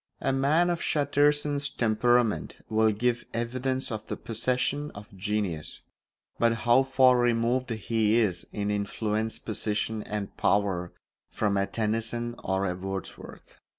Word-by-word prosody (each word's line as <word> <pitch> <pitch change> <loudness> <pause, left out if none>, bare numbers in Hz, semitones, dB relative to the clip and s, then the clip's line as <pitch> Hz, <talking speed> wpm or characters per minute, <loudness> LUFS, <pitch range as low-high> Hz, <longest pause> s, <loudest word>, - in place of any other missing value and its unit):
A - - 0
man 155 +6 +3
of 170 - -2
Chatterton's 145 0 +2
temperament 120 -1 +1
will 110 0 +3
give 120 +3 0
evidence 130 +3 -1
of 110 -1 -5
the - - -4
possession 125 +5 -1
of 100 0 -11
genius, 95 -5 -3 0.6
but 115 0 +4
how 120 +2 +6
far 130 -1 +4
removed 120 +2 +1
he 110 0 +1
is, 95 -7 0
in 105 -1 -2
influence, 105 +2 -1
position, 110 0 -2
and 105 -1 -5
power, 95 -3 +1 0.4
from 105 -2 0
a 100 0 +1
Tennyson 115 +2 -2
or 95 +1 0
a 90 - 0
Wordsworth! 95 +1 -7
115 Hz, 130 wpm, -27 LUFS, 105-125 Hz, 0.6 s, how